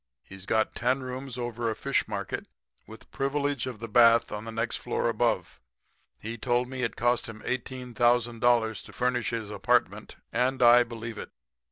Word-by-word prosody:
He's 95 0 -11
got 110 0 +1
ten 130 +2 0
rooms 130 0 -6
over 120 -1 -2
a 110 - -2
fish 140 +4 0
market 100 -3 -4 0.4
with - - -13
privilege 140 0 -1
of 125 -5 -6
the 115 - -5
bath 115 +1 +5
on 105 +1 -5
the 115 - -6
next 115 +1 -1
floor - - -2
above. - - -1 0.6
He 115 +1 -6
told 120 +1 +1
me 130 0 -5
it 115 - -1
cost 120 +1 +1
him 110 -1 -9
$18,000 120 -2 +1
to - - -13
furnish 125 -2 0
his 110 -3 -4
apartment, 100 - 0 0.2
and 130 +1 +1
I 120 +1 +8
believe 115 -1 -7
it. - - -7
120 Hz, 170 wpm, -28 LUFS, 115-125 Hz, 0.6 s, I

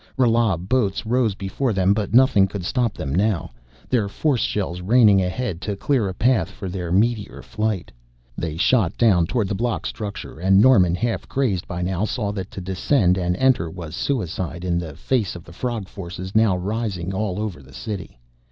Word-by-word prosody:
Rala 115 -6 +3
boats 100 +3 0
rose 115 -3 +1
before 105 +6 -2
them, 95 0 +3
but 105 -1 -2
nothing 120 -6 +5
could 95 -2 -6
stop 120 +1 0
them 70 - -4
now, 100 - 0 0.4
their 110 -6 +1
force 135 +3 0
shells 90 -4 -2
raining 105 -1 +5
ahead 95 0 -3
to 100 +2 -3
clear 115 -1 0
a - - -4
path 110 -6 +2
for 100 -1 -8
their 90 -2 -4
meteor 105 +2 0
flight. 105 -4 -2 0.4
They 80 +1 -4
shot 100 -1 +2
down 95 -8 +4
toward 115 -2 0
the 100 - -2
block 115 +4 -2
structure, 100 -6 -6
and 95 +2 +4
Norman, 100 -8 +5
half 115 +4 -2
crazed 110 -10 0
by 90 0 -4
now, 95 +2 -1
saw 105 -2 -2
that 95 -2 -5
to 95 - -7
descend 95 +1 +2
and 90 -1 0
enter 130 -10 +2
was 80 -2 -8
suicide 90 - -2
in 85 -1 +1
the 80 -4 -6
face 110 - -1
of 85 - -9
the 85 - -14
frog 115 -1 -3
forces 95 0 -7
rising 100 -2 0
now 95 - -4 0.2
over 105 -6 -4
all - - -15
the 65 - -16
city. 95 - -6
100 Hz, 190 wpm, -22 LUFS, 90-115 Hz, 0.4 s, nothing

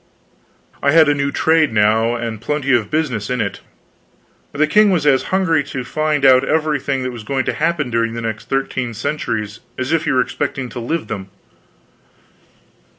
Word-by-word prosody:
I 140 - +2
had 160 -1 +6
a - - +4
new 140 0 -1
trade 160 -2 +2
now, 110 +2 +2
and 115 -2 -5
plenty 140 +1 0
of 110 -4 +1
business 130 -10 -1
in 125 0 -1
it. - - -2 0.9
The 150 +2 +2
king 210 +7 +4
was 175 -6 +1
as 135 -3 +3
hungry 175 -6 +2
to 130 -2 -5
find 150 +2 0
out 130 -1 +6
everything 145 -3 0
that 130 - -3
was 120 -3 -8
going 130 +2 -1
to - - -1
happen 155 -5 -1
during 115 0 0
the 115 - -4
next 110 -1 -5
thirteen 130 -3 -2
centuries 110 -5 -3 0.2
as 130 +2 -3
if 165 -1 +1
he - - +1
were 130 - +3
expecting 130 0 -3
to 125 - -7
live 160 +8 -2
in - - -16
them. 95 -3 -6
135 Hz, 185 wpm, -18 LUFS, 115-150 Hz, 0.9 s, had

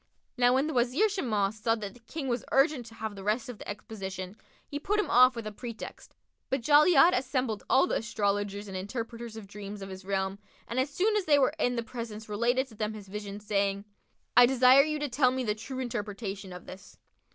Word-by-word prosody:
Now 245 0 +4
when 270 +2 +2
the 315 - -3
Wazir 255 - +3
Shimas 215 - -1
saw 225 +1 +2
that 205 -3 -6
the - - -17
King 270 +5 -6
was 240 -2 -1
urgent 270 -3 +3
to 225 - -13
have 220 -2 -5
the 195 - -9
rest 225 +6 0
of 245 - -8
the - - -8
exposition, 195 -2 -6 0.3
he 290 - -4
put 420 +7 0
him 420 - 0
off 255 +1 +7
with 230 -2 -5
a 215 - -4
pretext; 230 +2 -9 0.3
but 270 -1 0
Jali'ad 305 +4 +6
assembled 255 -4 -1
all 265 - +5
the - - 0
astrologers 205 -2 -1
and 190 - -7
interpreters 230 +3 -5
of 220 - -8
dreams 200 +1 -8
of 195 - -7
his 190 0 -8
realm 190 0 -2 0.3
and 240 - -2
as 260 +2 +1
soon 405 +9 +1
as 410 -3 +1
they 295 -2 +5
were 275 +1 +3
in 245 -4 +1
the 235 - -1
presence 225 -2 -7
related 240 +5 +1
to - - -15
them 215 0 -3
his 205 -2 -10
vision, 205 0 -6
saying, 200 -1 -1 0.5
"I 245 0 +9
desire 260 +1 +7
you 305 +1 -1
to 295 0 -2
tell 255 0 +3
me 260 0 -2
the 210 -3 0
true 230 +5 -7
interpretation 205 -5 -4
of 180 -1 -9
this." 185 +2 -12
230 Hz, 220 wpm, -29 LUFS, 205-260 Hz, 0.5 s, I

